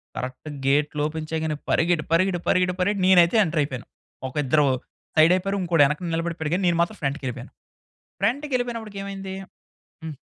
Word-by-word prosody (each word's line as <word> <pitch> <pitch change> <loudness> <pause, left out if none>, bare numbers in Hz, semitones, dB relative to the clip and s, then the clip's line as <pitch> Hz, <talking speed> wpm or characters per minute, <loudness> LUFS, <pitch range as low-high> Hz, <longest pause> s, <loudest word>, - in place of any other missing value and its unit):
కరెక్ట్‌గా 130 +4 -6
గేట్లు 145 +2 +1
ఓపెన్ 155 0 -6
చేయగానే 160 -1 -1
పరిగెట్టి 165 -1 +2
పరిగెట్టి 175 +2 +2
పరిగెట్టి 180 0 +2
పరిగెట్టి 195 +1 +1
నేనైతే 175 0 +6
ఎంటర్ 165 -4 -1
అయిపోయాను. 130 -4 -4 0.4
ఒక 130 - -10
ఇద్దరు 150 +3 +3 0.5
సైడ్ 160 +2 +6
అయిపోయారు. 195 +2 -1
ఇంకోడు 165 -4 +4
యెనకన 150 +5 -2
నిలబడిపోయాడు. 165 -2 -3
కానీ 190 - -1
నేను 170 -1 +2
మాత్రం 190 +5 -1
ఫ్రంట్‌కెళ్ళిపోయాను. 140 -3 -4 0.7
ఫ్రంట్‌కెళ్ళిపోయినప్పటికి 240 -3 -2
ఏమైంది? 195 -1 -6 0.7
హ్మ్. 160 -2 -6
170 Hz, 145 wpm, -24 LUFS, 150-190 Hz, 0.7 s, నేనైతే